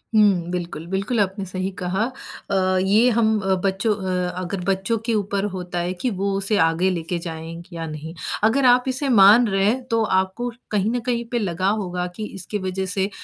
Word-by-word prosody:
हुँ, 195 -5 +4
बिल्कुल, 170 -3 -4
बिल्कुल 195 +6 -1
आपने 195 0 0
सही 185 +1 -3
कहा 185 +4 0 0.5
अ, 185 -1 +2
ये 215 +6 +4
हम 220 -2 +2
अ, 190 -1 +1
बच्चों 200 +3 +1
अ 185 -2 -2
अगर 185 +1 -4
बच्चों 195 +4 +1
के 230 - +1
ऊपर 200 -1 -1
होता 180 -1 -4
है 175 +1 -1
कि 255 - +1
वो 200 +1 0
उसे 200 +2 +1
आगे 165 +3 +3
लेके 170 -1 -2
जाएँगे 165 +1 -8
या 165 - -4
नहीं। 155 +1 -7 0.3
अगर 250 +5 +3
आप 250 0 +6
इसे 265 +2 0
मान 220 +1 +7
रहे 195 -1 +1
हैं 250 +5 +1
तो 230 0 +3
आपको 190 +4 0 0.2
कहीं 210 0 +1
न 245 - 0
कहीं 240 -2 0
पे 240 - +1
लगा 185 -2 0
होगा 180 -2 -3
कि 215 - -4
इसकी 195 +3 -4
वज़ह 190 0 -3
से 190 +1 -1
195 Hz, 200 wpm, -22 LUFS, 180-215 Hz, 0.5 s, मान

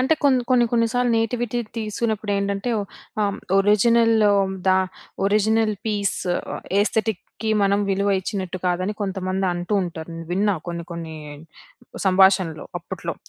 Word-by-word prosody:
అంటే. 265 +5 +3
కొన్ని, 260 -3 +4
కొన్ని, 250 -2 +5
కొన్ని 230 -1 +3
సార్లు 245 0 +2
నేటివిటీ 240 +1 -1 0.2
తీసుకున్నప్పుడు 215 -1 -2
ఏంటంటే, 200 +3 -1 0.5
ఆహ్, 200 -1 -1 0.2
ఒరిజినల్ 225 +3 +4
లోదా? 190 -2 +2 0.5
ఒరిజినల్ 215 +1 +2
పీస్ 205 -2 0 0.6
ఎస్థెటిక్‌‌కి 220 0 -2
మనం 200 +1 +3
విలువ 200 +1 +1
ఇచ్చినట్టు 185 -2 -4
కాదని, 185 +3 0
కొంతమంది 190 -1 -2
అంటూ 175 +4 -2
ఉంటారు. 170 -2 -6 0.2
విన్నా 200 +3 +2
కొన్ని, 170 0 -4
కొన్ని 165 -1 -6 0.9
సంభాషణలు 190 -3 +3
అప్పట్లో. - - -5
200 Hz, 115 wpm, -22 LUFS, 185-220 Hz, 0.9 s, కొన్ని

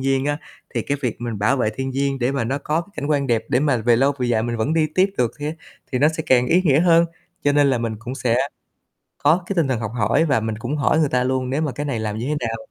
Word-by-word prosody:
nhiên 135 0 +1
á, 145 +1 -1 0.4
thì - - 0
cái 145 - -1
việc 125 -4 -3
mình 115 -4 -4
bảo 125 +7 +2
vệ 110 -4 +1
thiên 135 0 -2
nhiên 135 +1 -1
để 125 +2 0
mà 135 -4 -1
nó 135 +5 -1
có 155 +4 -1
cảnh 145 - -3
quan 145 -2 +1
đẹp 115 -3 +1
để 125 - +2
mà 145 -4 +2
về 115 0 +3
lâu 135 +3 +3
về 125 - 0
dài 115 -2 +1
mình 120 0 -2
vẫn 130 +9 0
đi 160 -1 +3
tiếp 190 +1 +3
được 120 -2 +2
thê 150 +2 -3 0.4
thì 125 - +1
nó 150 - +5
sẽ 160 0 -3
càng 125 -1 +4
ý 180 +6 +3
nghĩa 150 -4 +4
hơn. 170 -1 +5 0.4
Cho 145 - +4
nên 145 -1 +4
là 125 - +1
mình 115 -2 -3
cũng 120 +3 -6
sẽ 120 -3 0 0.8
có 165 +5 +3
cái 200 - -3
tinh 160 -5 +2
thần 125 -4 -1
học 115 -1 -4
hỏi 160 - +2
và 135 -7 +2
mình 110 -1 -3
cũng 145 +6 -3
hỏi 145 +2 +2
người 155 - +3
ta 125 -1 +1
luôn 130 0 -1
nếu 140 +4 0
mà 150 -4 -1
cái 145 +2 -4
này 130 -6 -2
làm 105 -1 -3
như 120 - -3
thế 150 -5 -1
nào, 115 - -3
135 Hz, 295 wpm, -21 LUFS, 120-150 Hz, 0.8 s, nó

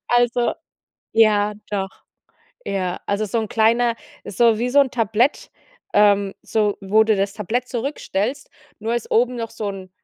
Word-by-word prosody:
Also, 240 0 +2 0.6
ja, 210 -2 +4 0.2
doch. 195 -2 -1 0.8
Ja, 185 -2 -2
also, 200 +1 0
so 215 +3 -2
'n 220 -2 -2
kleiner 230 +1 +2 0.3
so 225 +2 +2
wie 240 +2 0
so 285 - +5
'n 275 -2 +2
Tablett, 230 +3 0 0.4
ähm, 200 -1 +4
so, 210 -2 0
wo 210 +3 +3
du 220 -1 +2
das 195 0 0
Tablett 225 +4 -2
zurückstellst, 255 0 -3 0.3
nur 225 +2 -2
ist 240 - -4
oben 245 +2 +2
noch 230 -1 -4
so 220 -2 -4
'n 190 -1 -9
220 Hz, 155 wpm, -21 LUFS, 205-240 Hz, 0.8 s, so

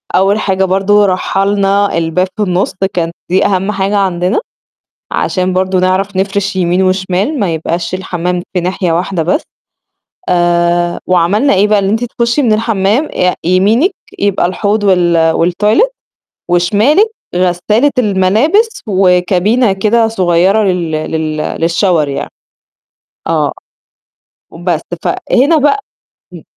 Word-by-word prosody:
أول 200 +3 +2
حاجة 190 -2 0
برضه 195 +2 +2
رحّلنا 195 +1 0
الباب 165 +3 0
في 215 - 0
النُص 185 -1 -1 0.2
كان 170 -2 -1 0.2
دي 190 +3 +2
أهم 195 0 0
حاجة 195 +1 -1
عندنا 185 - 0 0.7
عشان 185 -1 -1
برضه 185 0 0
نعرف 185 +2 0
نفرش 195 +1 -1
يمين 180 0 +1
وشمال 190 - -1
ما 175 -5 0
يبقاش 170 +2 -3
الحمّام 180 -1 -3
في 180 - +1
ناحية 180 0 -1
واحدة 175 0 -1
بس. 185 - 0 0.9
آآ، 175 0 +1
وعملنا 185 +9 +2
إيه 200 +2 +3
بقى، 210 -1 +3
إن 195 - -1
أنتِ 225 +3 0
تخشي 235 +3 -1
من 235 -5 +2
الحمّام 215 +4 0
آآ 180 0 +1
يمينِك 205 - +2 0.3
يبقى 200 -3 +1
الحوض 205 +3 -1
وال 175 -4 +3
والتويلت 210 - +1 0.6
وشمالِك 210 - +3 0.3
غسالة 185 +9 +1
الملابس 230 - +1
وكابينة 190 +4 +2
كده 225 +4 +1
صغيرة 190 0 +2
لل 180 -4 -1
لل 155 0 -3
للشاور 165 +1 0
يعني. 140 - -5 1.0
آه، - - 0 1.0
وبس، 170 -1 -2 0.2
فهنا 285 +6 +1
بق 290 +3 +3 0.6
امم. - - -11
190 Hz, 125 wpm, -12 LUFS, 175-210 Hz, 1.0 s, إيه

